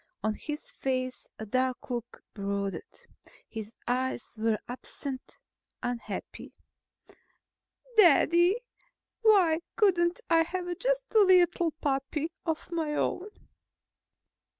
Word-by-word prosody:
On 215 Hz, 0 st, +1 dB
his 300 Hz, +7 st, -6 dB
face 255 Hz, -1 st, -2 dB
a 220 Hz, -, -6 dB
dark 255 Hz, +3 st, -1 dB
look 240 Hz, 0 st, -5 dB
brooded. 200 Hz, -, -4 dB, 0.4 s
His 220 Hz, 0 st, -7 dB
eyes 255 Hz, 0 st, -1 dB
were 220 Hz, 0 st, +1 dB
absent, 260 Hz, +1 st, -7 dB, 0.5 s
unhappy. 245 Hz, -1 st, -5 dB, 1.4 s
"Daddy, 345 Hz, +1 st, +6 dB, 0.6 s
why 380 Hz, -8 st, +5 dB, 0.2 s
couldn't 350 Hz, -4 st, +3 dB
I 330 Hz, -1 st, +5 dB
have 355 Hz, +1 st, -2 dB
just -, -, -1 dB
a 440 Hz, -, +6 dB
little 360 Hz, -3 st, +5 dB
puppy 285 Hz, +2 st, -2 dB, 0.2 s
of 320 Hz, +2 st, -2 dB
my 315 Hz, -3 st, -1 dB
own?" 375 Hz, +6 st, -1 dB
300 Hz, 100 wpm, -29 LUFS, 245-350 Hz, 1.4 s, Daddy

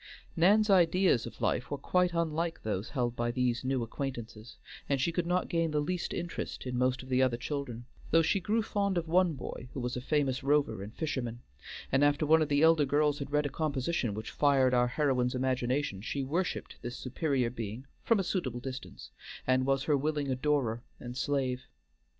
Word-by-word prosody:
Nan's 205 Hz, +5 st, +5 dB
ideas 180 Hz, -, +4 dB
of -, -, -11 dB
life 125 Hz, -, 0 dB
were 145 Hz, -, -2 dB
quite 180 Hz, +5 st, +1 dB
unlike 165 Hz, 0 st, -1 dB
those 105 Hz, 0 st, -2 dB
held 120 Hz, -3 st, -1 dB
by 120 Hz, 0 st, -1 dB
these 125 Hz, 0 st, 0 dB
new 130 Hz, -1 st, 0 dB
acquaintances, 115 Hz, -2 st, -6 dB, 0.3 s
and 140 Hz, -1 st, +2 dB
she 150 Hz, +6 st, +1 dB
could 170 Hz, 0 st, -1 dB
not 180 Hz, +1 st, +1 dB
gain 165 Hz, -1 st, +1 dB
the 150 Hz, -1 st, 0 dB
least 175 Hz, +4 st, -2 dB
interest 175 Hz, -5 st, -4 dB
in 125 Hz, -1 st, -3 dB
most 130 Hz, +1 st, +1 dB
of 130 Hz, -, -12 dB
the 130 Hz, 0 st, +3 dB
other 130 Hz, -2 st, +2 dB
children, 125 Hz, -3 st, -4 dB, 0.2 s
though 165 Hz, +1 st, +5 dB
she 195 Hz, +5 st, +2 dB
grew 215 Hz, +4 st, 0 dB
fond 200 Hz, -2 st, 0 dB
of 170 Hz, -1 st, -1 dB
one 175 Hz, 0 st, +3 dB
boy 125 Hz, -2 st, -7 dB
who -, -, -2 dB
was 125 Hz, 0 st, -2 dB
a 125 Hz, -, -3 dB
famous 135 Hz, -2 st, 0 dB
rover 140 Hz, -7 st, +1 dB
and 105 Hz, +3 st, -8 dB
fisherman, 120 Hz, -7 st, -3 dB, 0.5 s
and 135 Hz, +2 st, +3 dB
after 145 Hz, +1 st, +3 dB
one 160 Hz, +2 st, +5 dB
of 155 Hz, -, +1 dB
the 145 Hz, +1 st, +3 dB
elder 160 Hz, -2 st, +6 dB
girls 145 Hz, +1 st, +2 dB
had 140 Hz, -2 st, -5 dB
read 150 Hz, 0 st, +2 dB
a -, -, 0 dB
composition 140 Hz, -6 st, -1 dB
which 110 Hz, +1 st, -6 dB
fired 135 Hz, -3 st, +3 dB
our 125 Hz, 0 st, +4 dB
heroine's 125 Hz, -2 st, +1 dB
imagination, 130 Hz, -3 st, 0 dB
she 135 Hz, +5 st, -3 dB
worshiped 165 Hz, +7 st, -2 dB
this 120 Hz, 0 st, -5 dB
superior 130 Hz, -2 st, -1 dB
being 115 Hz, +1 st, -6 dB, 0.2 s
from 230 Hz, -3 st, +3 dB
a -, -, +1 dB
suitable 145 Hz, -, -2 dB
distance, 130 Hz, +1 st, -8 dB, 0.3 s
and 130 Hz, +1 st, +2 dB
was 135 Hz, 0 st, +2 dB
her 150 Hz, -1 st, +2 dB
willing 145 Hz, 0 st, -1 dB
adorer 130 Hz, -4 st, 0 dB, 0.2 s
and 120 Hz, 0 st, -7 dB
slave. 130 Hz, -2 st, -1 dB
140 Hz, 195 wpm, -31 LUFS, 125-160 Hz, 0.5 s, elder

